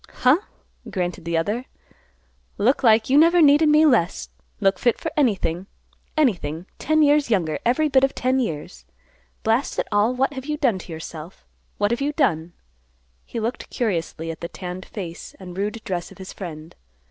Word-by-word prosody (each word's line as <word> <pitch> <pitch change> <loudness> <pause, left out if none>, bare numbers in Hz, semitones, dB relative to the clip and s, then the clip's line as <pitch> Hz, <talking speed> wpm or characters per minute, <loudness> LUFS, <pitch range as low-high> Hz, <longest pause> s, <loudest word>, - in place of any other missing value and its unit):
"Huh!" 255 +6 +6 0.5
grunted 180 -1 -3
the 170 0 0
other. 210 +10 -1 0.9
"Look 240 +7 +2
like 225 -3 +4
you 280 - +6
never 335 +2 +5
needed 300 0 +6
me 305 +1 +6
less. 180 - +2 0.3
Look 195 -1 +2
fit 240 - +2
for - - -4
anything, 195 - 0 0.5
anything; 175 - 0
ten 310 +1 +3
years 290 -2 +3
younger; 170 -8 +1
every 255 +6 +2
bit 270 -2 +3
of 270 - +2
ten 255 +1 +1
years. 150 - -4 0.6
Blast 225 +5 +1
it - - -1
all; 210 +4 +2
what 270 +3 +1
have 265 0 -7
you 300 0 -1
done 245 -10 +1
to 180 - -10
yourself? 160 +1 -9 0.3
What 205 +1 +1
have 235 - -1
you 290 +2 0
done?" 170 - 0 0.7
He 230 - -5
looked 230 +3 -4
curiously 165 -7 -2
at 160 - -10
the 170 - -4
tanned 180 0 -7
face 175 -5 -7
and 180 -2 -9
rude 210 +4 -2
dress 175 -2 -4
of - - -14
his 190 -1 -9
friend. 160 -4 -8
215 Hz, 175 wpm, -23 LUFS, 175-270 Hz, 0.9 s, Huh